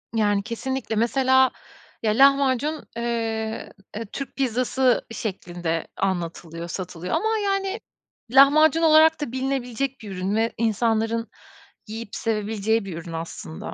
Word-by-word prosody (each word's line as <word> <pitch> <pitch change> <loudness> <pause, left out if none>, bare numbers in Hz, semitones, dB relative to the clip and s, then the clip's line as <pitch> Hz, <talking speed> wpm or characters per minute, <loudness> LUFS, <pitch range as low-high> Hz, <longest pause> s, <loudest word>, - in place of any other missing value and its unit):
Yani, 205 -2 +2
kesinlikle. 250 +1 -3
Mesela, 260 +3 +3 0.5
ya, 215 - +2
lahmacun, 275 +3 +3
eee, 225 -2 -2 0.2
e, 225 +2 -5
Türk 275 +6 -7
pizzası 255 0 +1
şeklinde 175 -6 -3
anlatılıyor, 170 -3 -3
satılıyor 180 0 -5
ama, 440 +1 +1
yani, 390 +1 -1 0.5
lahmacun 305 +4 +6
olarak 315 0 +6
da 245 - -3
bilinebilecek 265 0 -2
bir 210 -3 -8
ürün 190 +2 -2
ve 225 +1 +1
insanların 225 0 0 0.6
yiyip 220 0 -7
sevebileceği 220 -1 0
bir 175 -4 -6
ürün 170 0 -8
aslında. 160 - -6
230 Hz, 120 wpm, -24 LUFS, 200-265 Hz, 0.6 s, lahmacun